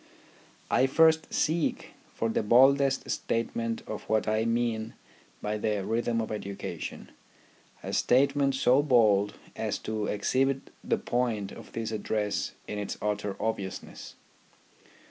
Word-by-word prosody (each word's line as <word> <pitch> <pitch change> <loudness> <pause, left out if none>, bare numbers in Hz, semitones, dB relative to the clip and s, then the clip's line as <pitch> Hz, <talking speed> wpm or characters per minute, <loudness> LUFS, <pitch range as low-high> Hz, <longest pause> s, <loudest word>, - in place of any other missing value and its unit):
I 130 - +4
first 160 +3 +4
seek 160 +1 0 0.2
for 115 - -2
the 110 - 0
baldest 135 +4 +4
statement 115 0 -2
of 110 - -5
what 110 -1 +1
I 110 +1 +1
mean 115 -1 -1 0.5
by 105 0 -2
the 105 -2 -1
Rhythm 115 0 0
of 110 - -4
Education, 100 -2 -6 0.7
a - - -5
statement 135 +1 +3
so 130 +1 +4
bald 110 -7 +3 0.2
as - - -2
to 110 -1 -2
exhibit 135 +6 0
the - - +1
point 115 -5 -1
of - - -12
this 115 -1 -3
address 105 -1 -2
in 105 - -4
its 105 - -4
utter 105 -1 -2
obviousness. 100 -4 -4
115 Hz, 125 wpm, -28 LUFS, 105-130 Hz, 0.7 s, I